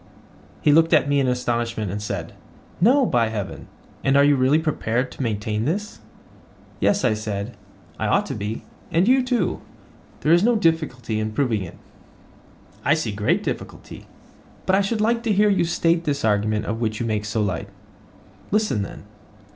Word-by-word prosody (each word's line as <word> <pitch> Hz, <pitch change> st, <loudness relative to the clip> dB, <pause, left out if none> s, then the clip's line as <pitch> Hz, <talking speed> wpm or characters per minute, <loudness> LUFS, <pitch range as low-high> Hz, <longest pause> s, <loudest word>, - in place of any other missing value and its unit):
He 150 Hz, -, +5 dB
looked 165 Hz, +2 st, +4 dB
at 150 Hz, -2 st, +4 dB
me 145 Hz, 0 st, +2 dB
in 135 Hz, -, +1 dB
astonishment, 120 Hz, -4 st, -1 dB
and 105 Hz, +1 st, -4 dB
said: 100 Hz, -5 st, -5 dB, 0.5 s
No, 255 Hz, +7 st, +5 dB
by 120 Hz, -, +2 dB
heaven: 105 Hz, -3 st, -5 dB, 0.4 s
And 135 Hz, +1 st, +3 dB
are 140 Hz, -, +6 dB
you 145 Hz, 0 st, +5 dB
really 130 Hz, +3 st, +3 dB
prepared 130 Hz, -6 st, -1 dB
to -, -, -8 dB
maintain 110 Hz, -1 st, -1 dB
this? 205 Hz, +8 st, -3 dB, 0.8 s
Yes, 200 Hz, -8 st, +2 dB
I 120 Hz, -, +3 dB
said, 105 Hz, +1 st, -4 dB, 0.4 s
I -, -, 0 dB
ought -, -, +2 dB
to -, -, -4 dB
be, 105 Hz, +2 st, -4 dB, 0.3 s
and 170 Hz, +4 st, +3 dB
you 260 Hz, +2 st, +5 dB
too—there 245 Hz, -, -3 dB
is 175 Hz, -, +5 dB
no 240 Hz, +1 st, +4 dB
difficulty 155 Hz, -, 0 dB
in 110 Hz, 0 st, -3 dB
proving 115 Hz, -4 st, 0 dB
it. 85 Hz, -, -8 dB, 1.1 s
I 150 Hz, -, +4 dB
see 140 Hz, -9 st, -2 dB
a -, -, -7 dB
great 105 Hz, 0 st, +1 dB
difficulty; -, -, -6 dB, 0.6 s
but 190 Hz, -, +3 dB
I 195 Hz, -, +3 dB
should 210 Hz, +2 st, -1 dB
like 230 Hz, +2 st, +2 dB
to 230 Hz, -2 st, -1 dB
hear 210 Hz, +1 st, +4 dB
you 190 Hz, -3 st, +2 dB
state 170 Hz, 0 st, +1 dB
this 140 Hz, -5 st, -1 dB
argument 105 Hz, 0 st, +1 dB
of 110 Hz, +3 st, -3 dB
which 110 Hz, -1 st, -1 dB
you 120 Hz, -, -2 dB
make 105 Hz, -2 st, -1 dB
so 105 Hz, 0 st, -1 dB
light. 100 Hz, 0 st, -3 dB, 0.8 s
Listen 210 Hz, -, +1 dB
then. 100 Hz, -, -7 dB
130 Hz, 180 wpm, -23 LUFS, 110-170 Hz, 1.1 s, are